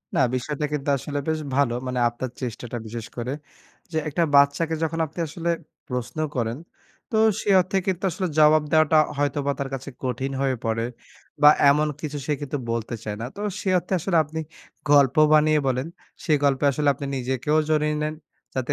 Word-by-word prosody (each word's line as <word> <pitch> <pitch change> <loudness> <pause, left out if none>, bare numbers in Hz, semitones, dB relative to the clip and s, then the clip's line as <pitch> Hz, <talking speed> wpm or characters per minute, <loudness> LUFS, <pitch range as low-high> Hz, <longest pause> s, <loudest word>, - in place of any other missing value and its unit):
না - - +2 0.2
বিষয়টা 150 +4 -2
কিন্তু 145 -1 -2
আসলে 145 +2 -4
বেশ 160 0 0 0.2
ভালো। 140 -4 +2
মানে 125 -1 -2
আপনার 120 +2 -5
চেষ্টাটা 120 -1 -5
বিশেষ 115 0 -6
করে। 120 +2 -3 0.6
যে 160 - -2
একটা 170 +4 +1
বাচ্চাকে 140 +4 +4
যখন 165 +1 -1
আপনি 160 +3 -11
আসলে 170 +2 -4 0.4
প্রশ্ন 125 +2 -4 0.2
করেন। 115 0 -1 0.5
তো 220 - +1 0.2
সে - - -3
অর্থে 185 +2 -2
কিন্তু 185 0 -1
আসলে 185 +1 -2
জবাব 155 0 +6
দেওয়াটা 155 0 +4 0.2
হয়তোবা 145 0 0
তার 140 -1 -2
কাছে 135 +1 -5
কঠিন 130 +2 -2
হয়ে 135 -1 +1
পড়ে 115 +1 0 0.6
বা, 150 - +9 0.2
এমন 150 +2 +3
কিছু 150 -1 -4
সে 150 - 0
কিন্তু 145 0 -3
বলতে 115 0 -3
চায় 105 -1 -4
না। - - -3
তো 205 - -7 0.2
সে 195 - -2
অর্থে 180 +2 -5
আসলে 175 0 +1
আপনি 155 +2 -6 0.5
গল্প 140 -3 +5 0.2
বানিয়ে 155 0 +5
বলেন। 130 +3 0 0.4
সে 155 - -1
গল্পে 140 0 +2
আসলে 145 +2 -1
আপনি 140 +1 -7
নিজেকেও 130 +4 0
জড়িয়ে 150 0 +2
নেন। 155 +1 -2 0.4
যাতে 130 -2 -2
145 Hz, 180 wpm, -24 LUFS, 130-155 Hz, 0.6 s, বা